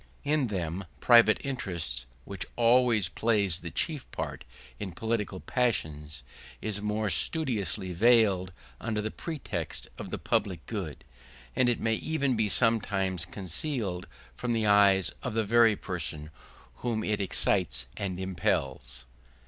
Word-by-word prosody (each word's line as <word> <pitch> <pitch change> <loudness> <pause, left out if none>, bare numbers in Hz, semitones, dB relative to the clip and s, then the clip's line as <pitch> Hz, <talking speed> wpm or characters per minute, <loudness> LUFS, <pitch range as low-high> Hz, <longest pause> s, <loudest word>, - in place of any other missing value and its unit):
In 145 -2 +1
them 95 -2 -3
private 115 - +6
interest, 85 - -3 0.2
which 100 -1 -5
always 120 -4 +4
plays 100 -4 +1
the 85 - -6
chief 150 - -2
part - - -5 0.4
in 95 -4 -5
political 105 -1 -2
passions, 75 - -2 0.4
is 105 -2 -3
more 105 0 0
studiously 105 - 0
veiled 100 -3 +4 0.3
under 110 -2 -2
the 110 +1 -2
pretext 110 - -5
of - - -6
the - - -3
public 90 -5 -1
good; 90 - -5 0.5
and 125 -1 +4
it 120 - 0
may 110 - +1
even 140 +1 0
be 110 -2 +1
sometimes 95 -6 +1
concealed 95 - -2 0.3
from 125 -1 -2
the 110 -1 +1
eyes 100 -3 +5
of - - -4
the 110 - +2
very 115 0 +5
persons 80 -5 -4 0.5
whom 115 -3 -2
it 105 -1 0
excites 90 -9 +1
and 95 -2 -3
impels. 70 -8 -2
105 Hz, 135 wpm, -29 LUFS, 90-115 Hz, 0.5 s, private